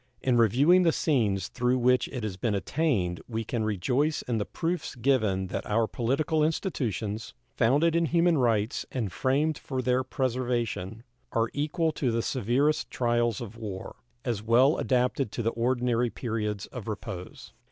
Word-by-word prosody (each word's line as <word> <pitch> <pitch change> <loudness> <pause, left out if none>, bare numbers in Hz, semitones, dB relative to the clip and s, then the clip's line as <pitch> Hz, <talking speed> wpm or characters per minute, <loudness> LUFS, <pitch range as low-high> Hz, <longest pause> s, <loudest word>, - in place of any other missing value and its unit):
In 130 -2 +2
reviewing 130 - +5
the 170 -2 +4
scenes 110 - +1
through 125 +1 0
which 125 0 +3
it 125 -4 -6
has 105 -4 -3
been 105 +3 -1
attained 100 - 0
we 115 -1 -3
can 110 +1 -2
rejoice 125 - 0
in 115 -3 -1
the 105 - -1
proofs 170 -2 -3
given 110 -7 +1
that - - -3
our 110 +2 +2
political 140 +8 0
institutions, 115 - -2 0.2
founded 145 +8 +3
in 170 -1 +2
human 170 -1 +3
rights 115 -3 +1
and 115 -7 -2
framed 140 - +1
for 130 -2 -4
their 125 +1 +1
preservation, 120 -5 -2 0.3
are 115 0 +1
equal 160 +3 0
to 140 -4 -1
the 115 0 0
severest 135 +5 +1
trials 120 -2 0
of 115 -1 -8
war, 100 -5 -7 0.3
as 115 -5 -1
well 120 +7 +4
adapted 125 -1 +1
to 120 - -2
the 115 - +1
ordinary 120 0 +1
periods 105 -4 -3
of 120 -3 -9
repose. 95 -4 -7
120 Hz, 160 wpm, -28 LUFS, 110-135 Hz, 0.3 s, reviewing